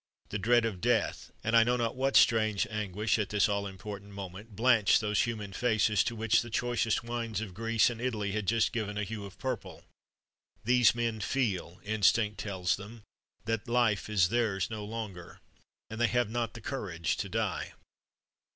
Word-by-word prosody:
The 105 - -3
dread 120 +3 +3
of 100 -6 -3
death, 120 -3 0
and 115 +2 +1
I 115 - +8
know 125 +1 +1
not 115 0 -1
what 135 +1 0
strange 110 -3 +4
anguish 105 +1 -1
at 105 - -1
this 105 -1 +3
all 100 -1 -1
important 100 +1 -8
moment, 100 +2 -8
blanch 115 -2 +4
those 105 -1 +1
human 105 -4 -5
faces, 110 -2 +2
to 120 - -2
which 115 0 +2
the 120 - -7
choicest 120 -1 0
wines 115 -3 -3
of 105 -4 -6
Greece 115 +1 +2
and 115 -1 -7
Italy 110 -5 -1
had 105 -1 -3
just 115 +1 +2
given 105 -3 -3
a 105 - -1
hue 105 0 -5
of 100 - -11
purple. 130 -4 -5 0.8
These 125 0 +4
men 115 -2 -1
feel 100 -7 -1
instinct 105 0 +2
tells 95 -4 -1
them 105 +2 -11 0.4
that 115 -1 -2
life 115 -5 +2
is 95 -5 +3
theirs 110 -4 0
no 110 -1 -4
longer, 105 -5 -7 0.5
and 110 +1 -6
they 120 - +5
have 120 -3 0
not 115 -1 -2
the 115 - -8
courage 90 - -2
to - - -3
die! - - -2
110 Hz, 180 wpm, -30 LUFS, 100-115 Hz, 0.8 s, I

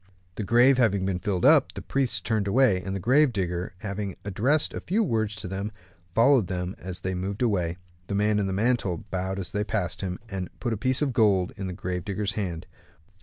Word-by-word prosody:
The 105 - -4
grave 120 +6 +5
having 100 -5 +2
been 95 -2 -1
filled 90 -2 -1
up, - - +5
the - - -5
priests 135 -2 +1
turned 110 -3 0
away, 110 -4 +3
and 95 +1 -4
the - - -2
grave 130 - +4
digger 90 -3 -3
having 100 -2 -4
addressed 125 +10 +1
a - - -3
few 210 +6 +1
words 110 - 0
to 105 - -6
them, 95 +3 -4 0.4
followed 120 -3 +5
them 90 0 -3
as 90 -1 -6
they 95 - -2
moved 95 +5 -3
away. 90 -7 0 0.3
The 100 - -2
man 105 +1 +2
in 100 - 0
the - - -2
mantle 100 -4 0
bowed 95 +1 -2
as 95 -3 -4
they 105 - 0
passed 105 -4 -2
him, 90 -2 -3
and 95 -4 -4
put 120 -2 -1
a - - 0
piece 130 +6 +1
of 135 -3 0
gold 100 -6 +3
into 95 - -5
the - - -11
grave 90 -1 -3
digger's 100 +1 -2
hand. 90 -5 -4
100 Hz, 220 wpm, -26 LUFS, 95-115 Hz, 0.4 s, grave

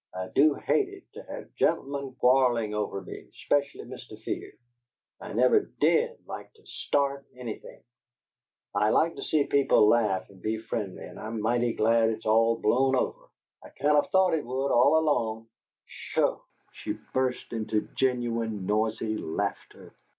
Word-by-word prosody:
I 95 0 -4
do 145 +1 +5
hate 400 -2 +1
it 390 -1 -12
to - - -9
have - - -8
gen'lemen 140 -1 -1
quarrelling 125 -4 +3
over 105 -2 -2
me, - - -10
especially 140 -1 -1
Mr. 120 -3 -10
Fear. - - -4 0.7
I - - -7
never 440 - +5 0.2
DID 475 +1 +2
like - - -8
to 440 - -24
START 140 -1 -1
anything; 120 -3 -8 0.9
I 105 - +2
like 165 +8 +2
to - - -6
see 155 -2 +1
people 140 -7 +4
laugh 105 -5 +2
and 95 -2 -18
be 110 +3 -1
friendly, 110 -4 -5
and - - -10
I'm 110 +1 -5
mighty 120 +2 +1
glad 115 +1 +3
it's 110 0 -5
all 115 +1 +3
blown 130 +5 +2
over. - - -2 0.3
I - - -12
kind 150 +1 +1
o' 145 - +6
thought 190 +3 +2
it 160 - 0
would, 130 +3 -2
all 140 +6 +5
along. 115 -8 0 0.4
PSHO!" - - -1 0.3
She - - -5 0.2
burst 130 -2 -1
into 110 -1 -1
genuine, 115 -5 -1
noisy 110 +1 0
laughter. 80 - -5
120 Hz, 155 wpm, -27 LUFS, 110-140 Hz, 0.9 s, o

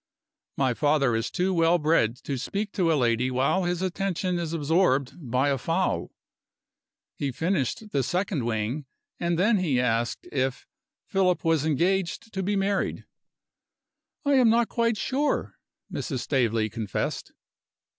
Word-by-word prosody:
My 130 -2 +2
father 145 -3 +2
is 115 +1 -1
too 185 +1 0
well 165 0 +4
bred 150 -8 +2
to 140 - -3
speak 205 - -3
to 175 -5 +1
a 155 - +3
lady 120 0 +2
while 135 +9 +1
his 175 +1 -1
attention 185 -1 -1
is 165 -2 -3
absorbed 150 -4 +2 0.2
by 130 +4 +2
a 135 -2 0
fowl. 165 +8 0 1.0
He 140 -2 -3
finished 175 - -1
the 140 - +1
second 175 - -1
wing, 120 +5 -2 0.3
and 170 -1 0
then 210 +5 +3
he 150 -9 +1
asked 120 -1 0
if 130 -1 -1 0.4
"Philip 180 -4 +1
was 160 -2 +2
engaged 185 - 0
to 190 - -2
be 200 +2 0
married." 195 0 -1 1.2
"I 285 - +3
am 255 -4 +5
not 230 0 +3
quite 230 -2 +1
sure," 275 +7 -1 0.3
Mrs. 130 -7 -3
Staveley 115 -5 +1
confessed. 110 -2 -4
165 Hz, 145 wpm, -26 LUFS, 130-190 Hz, 1.2 s, am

